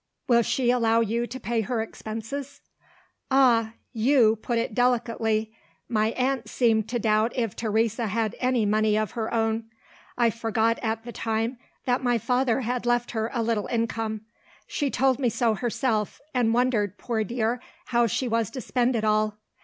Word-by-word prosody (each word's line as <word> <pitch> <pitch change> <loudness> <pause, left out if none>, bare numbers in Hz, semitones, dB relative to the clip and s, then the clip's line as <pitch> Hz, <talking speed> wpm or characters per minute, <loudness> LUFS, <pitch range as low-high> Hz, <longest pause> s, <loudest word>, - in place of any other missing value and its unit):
"Will 235 -3 +5
she 245 +1 +1
allow 230 -2 +3
you 230 +2 0
to 260 +2 -7
pay 235 -2 -1
her 225 +3 -2
expenses?" 225 +6 -6 0.7
"Ah, 240 -5 +4 0.2
you 230 -1 +4
put 235 +2 -2
it 230 -1 -1
delicately! 225 -3 +1 0.3
My 215 -2 +1
aunt 255 -3 -1
seemed 220 -3 +2
to 240 - 0
doubt 220 +1 +2
if 230 -6 -1
Teresa 225 +1 0
had 220 +1 -1
any 250 -3 +2
money 215 +1 +2
of 215 -2 -1
her 225 -2 -3
own. 225 0 0 0.5
I 235 -2 +3
forgot, 225 0 0
at 225 0 -2
the 240 - -7
time, 225 +2 -2 0.3
that 250 0 +1
my 245 -2 +2
father 250 +2 +1
had 245 0 -2
left 240 0 +1
her 220 -1 -1
a 235 -3 -1
little 220 -2 0
income. 225 -2 -2 0.4
She 285 - -1
told 265 0 +2
me 250 -3 +2
so 230 0 +1
herself, 225 -1 -1
and 245 -3 +2
wondered, 225 -5 +1
poor 225 -3 -1
dear, 235 +2 -1 0.2
how 240 -1 +2
she 250 +4 -1
was 230 -2 0
to 265 - -6
spend 245 0 +1
it 220 - -1
all. 215 0 +1
230 Hz, 170 wpm, -26 LUFS, 220-245 Hz, 0.7 s, Will